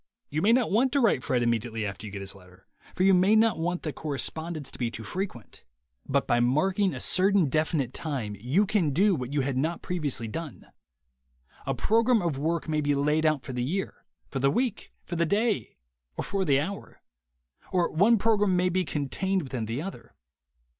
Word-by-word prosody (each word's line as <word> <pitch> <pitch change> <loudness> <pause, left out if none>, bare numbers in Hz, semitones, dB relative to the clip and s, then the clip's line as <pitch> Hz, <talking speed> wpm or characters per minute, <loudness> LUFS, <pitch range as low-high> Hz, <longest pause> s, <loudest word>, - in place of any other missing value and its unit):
You 155 - -1
may 210 - +4
not 245 -1 +3
want 245 +6 +3
to 285 - +3
write 215 - +2
Fred 125 -2 +1
immediately 115 -1 -1
after 100 +2 -6
you - - -8
get 100 0 -6
his 100 0 -5
letter, 90 -2 -18 0.3
for 185 - +1
you 195 0 +6
may 185 +4 +4
not 220 -4 +3
want 175 +2 -2
the 155 - -3
correspondence 155 +1 -4
to - - -11
be 120 -2 0
too 115 -1 -8
frequent. 175 - -4 0.4
But - - +1
by 120 - +2
marking 185 +11 +2
a - - -5
certain 190 -4 +3
definite 155 -3 0
time 130 -10 -4
you 140 - +2
can 190 -8 +1
do 195 +6 +4
what 130 -5 -3
you 145 -1 +1
had 135 -1 -2
not 160 +6 -1
previously 145 -10 -2
done. 160 +6 -7 1.0
A - - 0
program 230 +2 +3
of 165 -7 -2
work 165 +3 -1
may 155 -1 0
be 145 -1 +1
laid 150 +3 +2
out 150 -3 +1
for 130 - -7
the 125 0 -2
year, 185 +9 -3 0.2
for 135 - -4
the 135 +1 +3
week, 235 - -1
for 175 - -5
the 170 0 +2
day 215 +4 0 0.4
or - - -2
for 195 -1 -1
the 140 -4 +3
hour; 195 +7 -6 0.7
or 180 -2 +1
one 210 +8 +4
program 205 -3 +2
may 180 +1 +2
be 185 +1 +1
contained 175 +6 -1
within 125 -5 -4
the 120 +7 -3
other. 195 - -9
160 Hz, 200 wpm, -27 LUFS, 130-195 Hz, 1.0 s, you